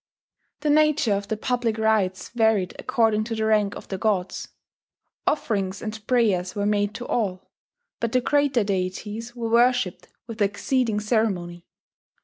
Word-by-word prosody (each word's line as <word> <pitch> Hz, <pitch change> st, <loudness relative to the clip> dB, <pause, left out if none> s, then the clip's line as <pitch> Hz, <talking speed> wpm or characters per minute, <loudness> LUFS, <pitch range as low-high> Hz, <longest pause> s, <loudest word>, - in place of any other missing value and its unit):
The 300 Hz, -, +2 dB
nature 305 Hz, -6 st, +3 dB
of 200 Hz, 0 st, -2 dB
the 220 Hz, -, -2 dB
public 240 Hz, -1 st, -1 dB
rites 215 Hz, -4 st, +1 dB
varied 220 Hz, -6 st, +1 dB
according 225 Hz, -4 st, +2 dB
to 225 Hz, 0 st, -3 dB
the 220 Hz, 0 st, -1 dB
rank 210 Hz, -2 st, +2 dB
of -, -, -10 dB
the 190 Hz, -, -4 dB
gods. 190 Hz, -4 st, -1 dB, 0.8 s
Offerings 200 Hz, -9 st, 0 dB
and 215 Hz, 0 st, -7 dB
prayers 200 Hz, -8 st, +2 dB
were 205 Hz, -1 st, -1 dB
made 205 Hz, 0 st, +1 dB
to 245 Hz, -, -6 dB
all; 190 Hz, -6 st, -2 dB, 0.5 s
but 230 Hz, -1 st, -1 dB
the 255 Hz, -, +2 dB
greater 280 Hz, -3 st, +2 dB
deities 205 Hz, +4 st, -3 dB
were 230 Hz, -2 st, -3 dB
worshipped 240 Hz, -5 st, +2 dB, 0.2 s
with 230 Hz, -2 st, -7 dB
exceeding 210 Hz, +2 st, +1 dB
ceremony. 195 Hz, -6 st, -1 dB
220 Hz, 145 wpm, -24 LUFS, 200-235 Hz, 0.8 s, nature